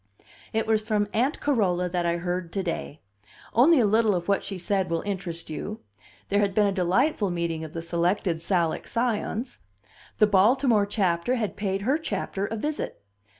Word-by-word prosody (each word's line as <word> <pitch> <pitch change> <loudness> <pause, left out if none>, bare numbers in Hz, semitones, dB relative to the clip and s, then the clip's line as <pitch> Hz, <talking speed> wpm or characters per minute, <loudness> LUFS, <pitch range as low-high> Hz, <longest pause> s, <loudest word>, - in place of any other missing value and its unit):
It 220 0 0
was 220 -1 +2
from 215 -1 0
Aunt 255 +7 +1
Carola 190 -10 +1
that 175 -1 -1
I 170 0 +1
heard 175 0 -3
to 195 - -1
day. 165 -3 -4 0.5
Only 275 +7 +6
a 230 - +4
little 215 0 +3
of 175 -1 -3
what 200 -1 +1
she 195 - -5
said 190 0 -1
will 165 0 -1
interest 175 -5 -5
you. 210 +7 -5 0.5
There 200 - +2
had 200 -2 +1
been 210 - +4
a 200 - +2
delightful 195 - +1
meeting 170 -2 -2
of 155 0 -8
the 165 -2 -5
Selected 170 +1 0
Salic 170 -2 0
Scions. 235 +1 -2 0.6
The 215 - +6
Baltimore 210 +2 +4
Chapter 195 +2 +1
had 220 -5 -2
paid 195 -1 -2
her 270 +8 +2
Chapter 200 -7 -3
a 225 - -4
visit. 295 - -4
200 Hz, 180 wpm, -26 LUFS, 175-220 Hz, 0.6 s, Only